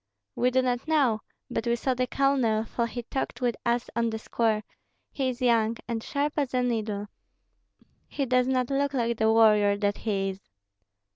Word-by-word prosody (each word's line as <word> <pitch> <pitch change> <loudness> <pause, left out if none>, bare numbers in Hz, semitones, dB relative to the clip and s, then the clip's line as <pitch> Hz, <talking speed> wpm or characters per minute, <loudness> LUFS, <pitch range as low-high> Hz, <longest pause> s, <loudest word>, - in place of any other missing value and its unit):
"We 250 - +2
do 260 +1 +2
not 245 +2 -1
know; 270 -9 +2 0.3
but 225 - -2
we 235 - +3
saw 260 +2 0
the 250 0 -1
colonel, 260 -6 +2
for 235 +1 -2
he 240 +1 -6
talked 245 -1 -4
with 245 -2 0
us 235 0 +1
on 230 0 +1
the 220 - -3
square, 220 -1 0 0.5
he 265 -2 -1
is 250 0 -5
young, 230 -2 +3
and 230 -2 -2
sharp 285 +4 -1
as 275 -3 0
a 250 - +2
needle. 215 -4 -1 1.0
He 280 - -2
does 255 0 +2
not 255 0 0
look 280 0 0
like 235 -2 0
the 220 0 +4
warrior 210 -2 +5
that 205 0 0
he 195 -3 -1
is." 190 0 -7
235 Hz, 190 wpm, -27 LUFS, 220-255 Hz, 1.0 s, warrior